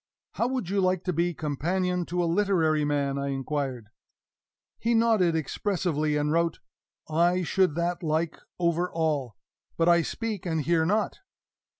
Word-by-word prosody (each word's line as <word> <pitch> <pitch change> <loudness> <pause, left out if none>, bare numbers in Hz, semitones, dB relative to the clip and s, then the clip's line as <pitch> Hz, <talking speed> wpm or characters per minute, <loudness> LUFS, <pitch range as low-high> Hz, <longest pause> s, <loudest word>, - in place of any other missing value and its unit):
"How 235 - 0
would 255 -6 -2
you 200 -1 +2
like 185 -1 +1
to 180 - -1
be 170 +1 0
companion 180 +5 -1
to 175 0 0
a - - +1
literary 165 -4 +2
man?" 140 -1 0
I 140 - -2
inquired. 135 -4 -3 0.9
He 235 +1 +1
nodded 220 -7 +3
expressively, 160 -2 -1
and 150 0 0
wrote: 165 0 +1 0.5
"I 175 +3 +2
should 185 -3 +2
that 175 +2 -1
like 160 0 -1 0.2
over 175 +1 0
all. 150 -9 -1 0.4
But 165 - +2
I 170 0 +6
speak 215 +3 -4
and 160 -3 -1
hear 160 +1 +2
not." 210 +3 0
170 Hz, 155 wpm, -27 LUFS, 150-185 Hz, 0.9 s, I